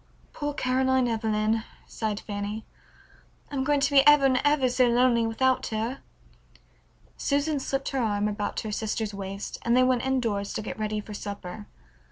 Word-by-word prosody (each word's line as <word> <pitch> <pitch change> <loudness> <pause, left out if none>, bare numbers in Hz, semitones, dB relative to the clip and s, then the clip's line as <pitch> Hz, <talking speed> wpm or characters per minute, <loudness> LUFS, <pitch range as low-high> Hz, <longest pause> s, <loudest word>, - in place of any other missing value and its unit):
"Poor 290 -1 -3
Caroline 260 -1 +2
Evelyn," 220 -1 0 0.2
sighed 215 -2 -3
Fanny, 205 +1 -5 0.9
"I'm 270 -2 -1
going 290 +1 +2
to 275 +1 +2
be 280 -1 +7
ever 295 -2 +7
and 260 -1 +3
ever 290 -3 +3
so 250 0 +3
lonely 240 -1 +3
without 260 +3 +1
her." 225 +4 -3 1.2
Susan 285 +1 0
slipped 270 0 -2
her 270 - -2
arm 210 -2 0
about 210 0 -3
her 215 - -5
sister's 215 0 -2
waist, 195 0 -6
and 235 +1 +2
they 255 - +6
went 255 -1 +2
indoors 230 -7 -1
to - - -3
get - - -6
ready 215 0 -2
for 210 - -10
supper. 205 -1 -7
235 Hz, 165 wpm, -27 LUFS, 210-265 Hz, 1.2 s, be